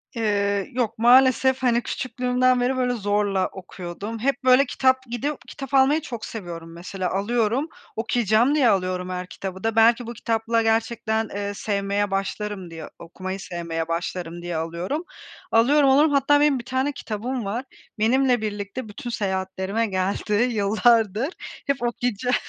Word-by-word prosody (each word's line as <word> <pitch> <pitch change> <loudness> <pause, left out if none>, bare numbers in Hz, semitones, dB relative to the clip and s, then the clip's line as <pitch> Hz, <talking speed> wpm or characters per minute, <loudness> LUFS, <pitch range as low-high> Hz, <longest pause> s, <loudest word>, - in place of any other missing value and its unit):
Eee, 200 -3 0
yok 235 -3 -1
maalesef, 260 +2 +5
hani, 240 -1 +3
küçüklüğümden 255 0 +1
beri, 255 +2 +1
böyle, 250 -1 +1
zorla 205 -3 0
okuyordum. 190 +4 -7
Hep, 275 +4 -1
böyle, 255 +2 +6
kitap 260 0 +2
gidip 260 +4 -3
kitap 270 -1 -8
almayı 275 +4 +4
çok 235 -6 -6
seviyorum 170 -6 -7
mesela, 180 +2 -4
alıyorum, 230 +7 0 0.3
okuyacağım 230 +3 +2
diye 270 -6 +4
alıyorum 185 -2 0
her 180 0 -4
kitabı 190 0 -7
da. 225 -1 0
Belki 230 +1 +4
bu 235 - -5
kitapla 230 0 0
gerçekten, 225 -1 0
eee, 205 0 -3
sevmeye 200 0 -1
başlarım 195 -1 -3
diye, 165 -1 -8
okumayı 185 +3 -6
sevmeye 170 -3 -4
başlarım 170 0 -4
diye 175 -1 -3
alıyorum. 170 - -3 0.5
Alıyorum, 275 +5 +5
alıyorum, 290 +3 +5
hatta 285 +1 +4
benim 290 -3 +3
bir 235 - -9
tane 260 +3 0
kitabım 240 -1 -4
var. 230 +7 -3 0.3
Benimle 250 +2 +3
birlikte 210 +3 -4
bütün 240 +4 -7
seyahatlerime 190 0 -2
geldi 195 +2 -1
yıllardır. 220 +1 +2 0.4
Hep 275 -4 0
okuyacağım 245 0 0
225 Hz, 145 wpm, -24 LUFS, 195-250 Hz, 0.5 s, böyle